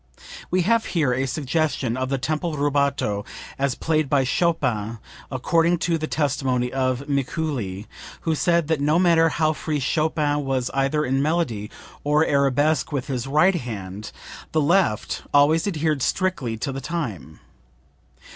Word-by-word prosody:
[We 185 0 +2
have 230 +4 +2
here 145 -6 +3
a 130 +2 0
suggestion 140 -3 -1
of 130 0 -2
the 135 - 0
tempo 155 +5 -2
rubato 140 -8 0 0.4
as 140 -2 +1
played 155 -3 0
by 140 -1 +3
Chopin 125 -8 0 0.3
according 165 +6 +2
to 165 -2 +1
the 155 - -3
testimony 130 -5 0
of 130 +1 -1
Mikuli, 135 - -2 0.4
who 165 - 0
said 170 0 +2
that 160 -3 0
no 150 +3 +3
matter 170 -2 +4
how 155 0 +1
free 150 0 -2
Chopin 150 +1 0
was 130 -2 -1
either 135 +3 +1
in 135 +2 +1
melody 145 -10 -1 0.3
or 150 +2 +3
arabesque 140 +1 +2
with 135 -4 -2
his 130 -2 -3
right 155 +7 +4
hand, 105 - -6 0.4
the 160 - +3
left 145 - +1
always 155 +5 +4
adhered 155 -6 0
strictly 135 -10 -1
to 135 - -3
the 135 +1 -5
time. 120 - -5
145 Hz, 145 wpm, -23 LUFS, 130-160 Hz, 0.4 s, matter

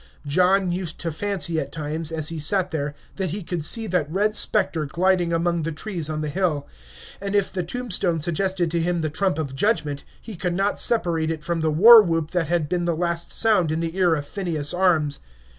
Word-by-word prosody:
John 185 +5 +2
used 175 -2 -4
to 165 - -3
fancy 170 -2 -1
at 140 -2 -5
times, 155 +1 -4
as 155 -2 0
he 165 -1 -5
sat 185 +4 +1
there, 145 -2 -3 0.2
that 190 -2 -2
he 195 +5 -5
could 170 -2 -4
see 225 +8 +3
that 175 -7 -1
red 210 +4 +1
specter 185 -7 +2
gliding 175 +2 +1
among 170 0 0
the 165 +1 -3
trees 165 -1 -4
on 155 0 -3
the 150 - -3
hill; 160 -3 -1 0.5
and 200 0 -3
if 200 -2 +1
the 185 - -1
tombstone 180 -3 -2
suggested 175 +1 -1
to 170 0 0
him 175 0 -1
the 155 -1 -2
trump 185 +1 0
of 140 -4 -4
judgment, 150 -5 0 0.2
he 220 - -9
could 175 0 -2
not 195 +2 0
separate 170 -8 +1
it 160 -2 -4
from 170 +1 -2
the 160 - +1
war 220 +9 +9
whoop 165 -4 -1
that 175 -3 0
had 170 -2 0
been 175 +2 -1
the 170 -1 0
last 170 0 -1
sound 205 -8 +2
in 160 - -1
the 165 0 -3
ear 180 -4 +3
of 145 -2 -4
Phineas 165 -4 -2
Arms. 165 -6 +1
170 Hz, 215 wpm, -23 LUFS, 155-190 Hz, 0.5 s, war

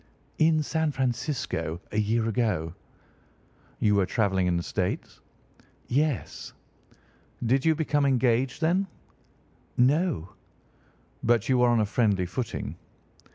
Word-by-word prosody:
"In 155 -1 +4
San 160 0 0
Francisco, 130 - -2
a 105 - 0
year 110 +2 +1
ago." 105 -9 0 1.1
"You 105 - +3
were 100 -2 +2
travelling 95 -4 +1
in 90 -1 +1
the 85 - -2
States?" - - -3 0.7
"Yes." 145 -1 -1 0.9
"Did 130 +3 +2
you 160 -1 +4
become 145 -2 +1
engaged 130 +1 +1
then?" 180 +5 +2 0.9
"No." 135 - +2 0.9
"But 115 -2 +2
you 130 -1 +3
were 125 0 +5
on 120 -1 +3
a - - +2
friendly 100 -4 +1
footing?" 105 +6 -4
120 Hz, 115 wpm, -27 LUFS, 105-145 Hz, 1.1 s, were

